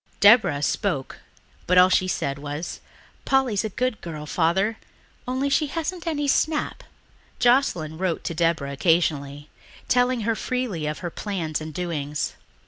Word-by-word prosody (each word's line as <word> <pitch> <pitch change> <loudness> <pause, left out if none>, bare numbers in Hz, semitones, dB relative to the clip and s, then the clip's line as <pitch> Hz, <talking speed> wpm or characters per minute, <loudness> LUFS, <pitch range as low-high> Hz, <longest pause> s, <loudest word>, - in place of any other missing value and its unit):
Deborah 205 -9 +6
spoke, 150 -3 -1 0.5
but 180 - +3
all 180 0 +8
she 185 0 +3
said 140 -6 -2
was, 145 +3 -5 0.4
"Polly's 260 -7 +2
a 220 - -2
good 250 +2 -2
girl, 155 -3 -6
Father, 185 +8 +1 0.5
only 260 +2 0
she 295 +2 +2
hasn't 330 +3 -4
any 295 -3 -1
snap." 305 +2 0 0.5
Joscelyn 210 - +2
wrote 185 -3 -1
to - - -3
Deborah 165 -4 0
occasionally, 145 -2 +1 0.4
telling 250 -1 +2
her 225 +2 +1
freely 225 - -2
of 150 - -3
her 175 - -3
plans 165 -7 -3
and 155 0 -6
doings. 150 -3 -3
180 Hz, 140 wpm, -24 LUFS, 155-250 Hz, 0.5 s, all